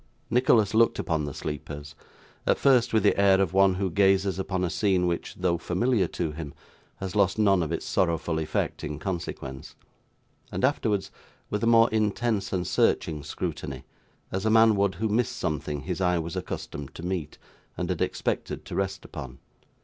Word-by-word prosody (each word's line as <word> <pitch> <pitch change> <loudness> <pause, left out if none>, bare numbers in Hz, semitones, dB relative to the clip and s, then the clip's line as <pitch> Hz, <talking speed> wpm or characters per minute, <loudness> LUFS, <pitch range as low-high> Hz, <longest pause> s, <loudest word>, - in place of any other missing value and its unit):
Nicholas 115 -4 +4
looked 115 +1 +4
upon 80 -2 -1
the 75 - -4
sleepers; 75 -1 -6 0.5
at - - +4
first, 130 -4 +4
with 110 -3 +2
the 105 - +4
air 95 -1 +5
of 95 -2 +1
one 95 -1 +5
who 95 -1 -1
gazes 95 0 +3
upon 95 -1 -1
a 90 - 0
scene 95 -4 +2
which, 85 -1 -2
though 90 -2 0
familiar 100 +2 +1
to 80 - -3
him, 75 -2 -7 0.4
has 95 0 -6
lost 100 -2 +3
none 100 -4 +4
of 80 -1 -2
its 85 - -3
sorrowful 85 -2 0
effect 75 -1 -2
in 75 -1 -4
consequence; 75 -5 -5 0.8
and, - - +1
afterwards, 110 -8 0 0.4
with 105 +2 -1
a - - +2
more 115 0 +6
intense 110 -1 0
and 90 -2 -1
searching 75 -2 +1
scrutiny, - - -5 0.5
as 95 +1 -2
a 110 - +2
man 110 0 +6
would 100 -1 +1
who 110 +5 -1
missed 110 +2 0
something 75 -2 -2
his 90 +2 -4
eye 90 -1 +2
was 85 0 -4
accustomed 70 -1 -6
to 80 - -8
meet, 90 -5 -3 0.4
and - - -2
had - - -3
expected - - -2
to - - -8
rest 95 -1 -2
upon. 65 -2 -8
95 Hz, 180 wpm, -27 LUFS, 80-105 Hz, 0.8 s, more